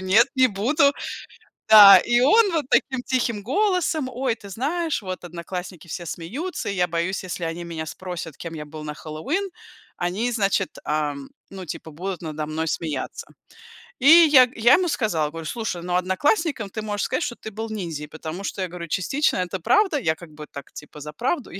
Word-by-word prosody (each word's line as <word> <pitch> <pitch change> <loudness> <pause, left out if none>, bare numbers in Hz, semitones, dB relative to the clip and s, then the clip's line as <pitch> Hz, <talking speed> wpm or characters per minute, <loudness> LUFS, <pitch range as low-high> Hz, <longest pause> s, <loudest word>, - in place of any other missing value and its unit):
"Нет, 195 +6 +4
не 260 -1 +5
буду". 250 +8 +3 0.8
Да, 205 -2 +11
и 240 0 +2
он 395 - +5
вот 315 -4 0
таким 260 -2 +2
тихим 235 -5 -1
голосом: 325 - 0
"Ой, 250 -1 -1
ты 200 -3 -12
знаешь, 310 - -1
вот 185 -1 -6
одноклассники 175 0 -7
все 175 +2 -5
смеются, 245 - -5
и 200 - -2
я 180 -1 +2
боюсь, 170 +3 -2
если 180 -1 -4
они 165 +1 -4
меня 165 -2 -5
спросят, 175 -3 -7
кем 170 -1 -7
я 150 -1 -6
был 155 +1 -9
на 150 - -4
Хэллоуин, 165 - -3 0.5
они, 195 +8 -1
значит, 200 -4 0
ам, 145 -2 -2 0.2
ну, 190 -1 -8
типа, 160 -1 -7
будут 180 +3 -5
надо 155 -2 -4
мной 160 +1 -2
смеяться". 150 -4 -4 0.7
И 270 - +2
я 310 -6 +8
я 235 +3 +5
ему 365 -1 +4
сказала, 175 - 0
говорю: 165 +1 -8
"Слушай, 180 -2 -4
ну, 180 0 -2
одноклассником 220 - 0
ты 215 - -4
можешь 205 -1 -2
сказать, 260 - -1
что 240 - -3
ты 220 - -9
был 220 +2 -5
ниндзей", 170 -8 -5
потому 160 +5 -7
что 195 - -4
я - - -2
говорю: 170 -1 -8
"Частично 270 - 0
это 180 +1 -2
правда". 375 - +2
Я 160 -9 0
как 170 -2 -13
бы 150 0 -10
так, 140 - -10
типа 150 0 -11
за 150 +1 -8
правду, 260 - -2
я 195 - -7
190 Hz, 190 wpm, -23 LUFS, 165-255 Hz, 0.8 s, Да